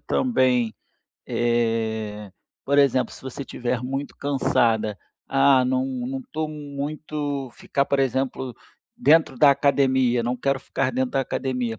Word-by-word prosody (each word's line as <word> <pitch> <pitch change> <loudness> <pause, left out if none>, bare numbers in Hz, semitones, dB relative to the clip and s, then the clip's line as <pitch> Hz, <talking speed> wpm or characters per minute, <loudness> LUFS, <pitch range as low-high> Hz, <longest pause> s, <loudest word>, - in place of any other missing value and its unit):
também, 125 - +1 0.5
eh, 110 -3 -1 0.3
por 140 +1 +2
exemplo, 130 -2 +3
se - - -12
você 130 +1 -6
estiver 125 -2 -3
muito 135 +2 -4
cansada, 115 -6 +1 0.3
ah, 135 -1 +4
não 130 +1 +1 0.2
não 135 0 -4
tô 155 0 -2
muito 145 -1 -4
ficar, 140 - -1
por 140 - 0
exemplo, 130 -1 -1 0.4
dentro 160 - +4
da 145 +2 +7
academia, 130 -3 +2
não 120 +2 -1
quero 135 +2 0
ficar 135 -1 -1
dentro 130 0 0
da 135 - +2
academia, 125 -4 -2
130 Hz, 130 wpm, -24 LUFS, 120-140 Hz, 0.5 s, da